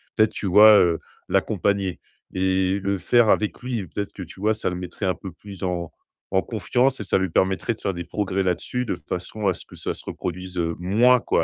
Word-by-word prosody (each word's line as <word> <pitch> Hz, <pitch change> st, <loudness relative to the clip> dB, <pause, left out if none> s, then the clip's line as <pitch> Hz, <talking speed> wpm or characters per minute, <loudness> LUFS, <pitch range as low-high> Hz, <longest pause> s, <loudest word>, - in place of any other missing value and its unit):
Peut-être 110 Hz, -1 st, +3 dB
tu -, -, -5 dB
vois, 105 Hz, +3 st, +8 dB
heu, 85 Hz, -2 st, +3 dB, 0.3 s
l'accompagner 100 Hz, -2 st, 0 dB, 0.3 s
et 95 Hz, +1 st, +1 dB
le 100 Hz, 0 st, -1 dB
faire 115 Hz, +5 st, +3 dB
avec 105 Hz, 0 st, +2 dB
lui, 120 Hz, -5 st, -3 dB
peut-être 100 Hz, +5 st, -4 dB
que, 95 Hz, -, -8 dB
tu 90 Hz, +2 st, -13 dB
vois, 110 Hz, +2 st, +2 dB
ça 110 Hz, -, -2 dB
le 90 Hz, -, -4 dB
mettrait 90 Hz, +2 st, -5 dB
un 90 Hz, -, +2 dB
peu 95 Hz, 0 st, -9 dB
plus 100 Hz, +2 st, -12 dB
en 85 Hz, -3 st, -2 dB, 0.4 s
en 95 Hz, -, +3 dB
confiance 125 Hz, +6 st, 0 dB
et -, -, -3 dB
ça 95 Hz, -, +1 dB
lui 95 Hz, 0 st, 0 dB
permettrait 95 Hz, +5 st, +1 dB
de -, -, -24 dB
faire 95 Hz, -, -1 dB
des 85 Hz, 0 st, -5 dB
progrès 95 Hz, +1 st, -2 dB
là-dessus 95 Hz, +7 st, -1 dB
de 105 Hz, -7 st, -3 dB
façon 90 Hz, +4 st, -4 dB
à 95 Hz, -, +3 dB
ce -, -, -11 dB
que -, -, -15 dB
ça -, -, -3 dB
se -, -, -11 dB
reproduise, 90 Hz, +1 st, -5 dB
heu, 85 Hz, -1 st, 0 dB
moins, 115 Hz, +8 st, +4 dB
quoi, -, -, +1 dB
95 Hz, 225 wpm, -23 LUFS, 90-105 Hz, 0.4 s, vois